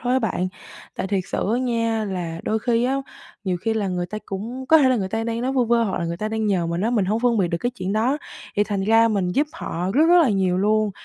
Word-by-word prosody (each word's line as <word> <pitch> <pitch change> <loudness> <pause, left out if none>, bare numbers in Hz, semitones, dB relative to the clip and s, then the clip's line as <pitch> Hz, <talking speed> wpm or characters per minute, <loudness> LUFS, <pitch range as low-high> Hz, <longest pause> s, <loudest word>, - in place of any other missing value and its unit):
thôi 245 +1 -1
á 260 - +4
bạn. 190 -6 -1 0.5
Tại - - -3
thiệt 190 -2 -1
sự 200 - 0
á - - +1
nha 230 -3 0
là 175 -4 -4
đôi 220 - 0
khi 235 +1 +1
á, 260 +2 +1 0.5
nhiều 185 -2 0
khi 225 +3 -1
là 210 -3 -1
người 180 -1 -2
ta 215 +4 -5
cũng 235 +7 -5
có 320 +4 +7
thể 275 -4 +4
là 255 - +3
người 195 -4 -2
ta 225 +3 -2
đang 230 0 -2
nói 255 +2 -1
vu 255 -2 +2
vơ 235 0 +3
hoặc 195 - -2
là 170 - -2
người 170 0 -3
ta 215 +4 -3
đang 220 0 -1
nhờ 185 -5 +1
mình 170 +1 -2
á, 220 +4 +1
mình 220 -6 +2
hông 215 +4 0
phân 240 -3 +2
biệt 180 - +2
được 170 - -2
cái 245 +5 -1
chuyện 190 -5 -4
đó, 240 +7 +1 0.4
thì 205 - +3
thành 205 -2 -2
ra 225 +2 +5
mình 200 -5 0
giúp 290 +9 +2
họ 175 +3 -4
rất 305 +4 +5
rất 350 0 +7
là 270 - +3
nhiều 190 -3 +1
luôn. 215 +1 +2
215 Hz, 295 wpm, -22 LUFS, 190-235 Hz, 0.5 s, có